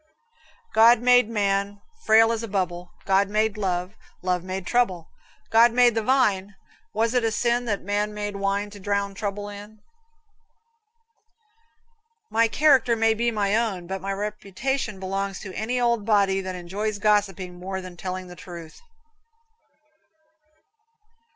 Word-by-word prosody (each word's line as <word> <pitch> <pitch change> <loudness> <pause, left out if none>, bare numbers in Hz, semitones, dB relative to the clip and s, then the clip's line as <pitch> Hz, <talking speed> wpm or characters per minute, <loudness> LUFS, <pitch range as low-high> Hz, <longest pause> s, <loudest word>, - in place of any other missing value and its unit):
God 230 +2 +6
made 245 -1 +4
man 200 -2 -1 0.3
Frail 225 +1 +6
as 230 -1 -2
a 230 - -5
bubble; 180 -3 -3 0.2
God 195 +1 +2
made 215 0 +1
Love, 185 -2 -2 0.3
Love 180 -1 0
made 185 0 -5
trouble; 190 -9 0 0.4
God 230 +1 +6
made 245 -1 +5
the 225 - 0
vine; 210 -5 +1 0.4
Was 225 +2 0
it 250 -2 +2
a 225 - +1
sin 240 +2 0
That 205 -4 -2
man 205 +2 -1
made 205 -1 -5
wine 200 +1 -1
To 205 - -11
drown 200 0 -1
trouble 205 0 -4
in? 205 +1 -10 2.5
"My 230 +1 +3
character 260 -2 +4
may 225 0 +3
be 235 +2 0
my 210 -2 0
own, 215 -6 -1
but 190 +1 -5
my 195 +1 -3
reputation 210 +3 -3
belongs 195 0 -3
to 190 -2 -8
any 240 +5 -2
old 235 -3 +1
body 200 -2 +2
that 185 -1 -5
enjoys 200 +4 -4
gossiping 195 -4 0
more 190 +1 -4
than 185 -1 -9
telling 185 +1 -5
the 180 0 -11
truth." 170 -2 -11
205 Hz, 145 wpm, -24 LUFS, 190-225 Hz, 2.5 s, God